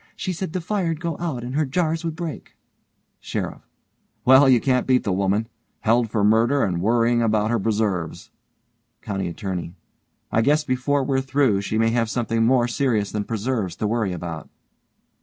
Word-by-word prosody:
She 185 - -3
said 180 -1 -4
the 185 - -2
fire'd 170 -4 -1
go 170 -2 -3
out 155 -9 -3
and 125 +1 -5
her 155 +2 +2
jars 160 +3 -1
would 165 -2 -3
break. 165 -3 -7 0.6
SHERIFF: - - -4 0.6
Well, 130 +2 +7
can 130 +2 +1
you - - +1
beat 130 -1 +2
the 100 - -1
women! 100 +3 0 0.3
Held 115 +1 +2
for 105 -1 0
murder 115 +6 +3
and 85 -3 -1
worryin' 120 +3 +2
about 110 -1 +1
her 120 - +1
preserves. 105 -6 -2 0.7
COUNTY 95 -3 -3
ATTORNEY: 90 -1 -5 0.6
I 110 - +3
guess 150 +5 +3
before 135 +1 0
we're 135 0 0
through 130 -6 +1
she 105 +2 -2
may 115 0 +3
have 115 -1 0
something 115 -1 0
more 120 0 +3
serious 120 -5 0
than 105 -1 -2
preserves 110 -5 -2
to - - -3
worry 110 -2 0
about. 85 -2 -6
115 Hz, 175 wpm, -23 LUFS, 105-140 Hz, 0.7 s, Well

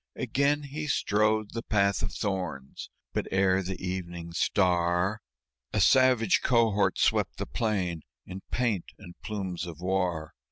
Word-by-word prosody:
Again 145 +2 +1
he 150 +2 -5
strode 110 -3 +1
the 115 - -3
path 100 -4 +1
of 105 - -2
thorns; 90 -10 -4 0.2
but - - -1
ere 95 0 +3
the 95 0 -5
evening 85 -2 -5
star 90 +2 +1 0.5
A 105 - +1
savage 125 0 +4
cohort 115 -5 +2
swept - - +1
the - - -3
plain 95 -7 -1 0.2
in 95 +1 -8
paint 115 -8 -1
and 90 -5 -12
plumes 95 -5 -4
of 85 -3 -8
war. 90 -4 -1
95 Hz, 135 wpm, -28 LUFS, 90-110 Hz, 0.5 s, savage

